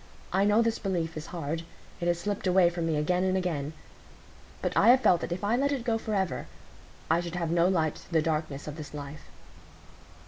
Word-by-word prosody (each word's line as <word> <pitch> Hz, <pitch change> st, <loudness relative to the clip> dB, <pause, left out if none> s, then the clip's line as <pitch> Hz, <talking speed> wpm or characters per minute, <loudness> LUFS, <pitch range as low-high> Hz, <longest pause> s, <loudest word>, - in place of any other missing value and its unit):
I 195 Hz, +2 st, +3 dB
know 210 Hz, +3 st, +4 dB
this 230 Hz, -1 st, 0 dB
belief 170 Hz, -5 st, -2 dB
is 155 Hz, +1 st, -6 dB
hard; 165 Hz, -2 st, -3 dB, 0.4 s
it 175 Hz, -, -2 dB
has 175 Hz, 0 st, +2 dB
slipped 200 Hz, +2 st, -3 dB
away 180 Hz, -1 st, +5 dB
from 170 Hz, -1 st, -2 dB
me 160 Hz, -, +1 dB
again 180 Hz, +5 st, +1 dB
and 190 Hz, 0 st, +2 dB
again; 160 Hz, -5 st, -2 dB, 0.9 s
but -, -, -2 dB
I -, -, +5 dB
have 255 Hz, +2 st, +7 dB
felt 175 Hz, -8 st, +4 dB
that -, -, -4 dB
if 180 Hz, +3 st, -3 dB
I 210 Hz, +3 st, +2 dB
let 280 Hz, +3 st, +1 dB
it 270 Hz, -4 st, -2 dB
go 230 Hz, -2 st, 0 dB
forever, 200 Hz, -5 st, -2 dB, 0.6 s
I 165 Hz, -, +4 dB
should 175 Hz, 0 st, -5 dB
have 170 Hz, -2 st, -1 dB
no 170 Hz, +1 st, +4 dB
light 160 Hz, -5 st, +1 dB
through 165 Hz, -, -2 dB
the 155 Hz, -, +3 dB
darkness 155 Hz, -3 st, -2 dB
of 150 Hz, 0 st, -6 dB
this 150 Hz, -1 st, -8 dB
life." 145 Hz, +1 st, -8 dB
175 Hz, 215 wpm, -28 LUFS, 160-195 Hz, 0.9 s, have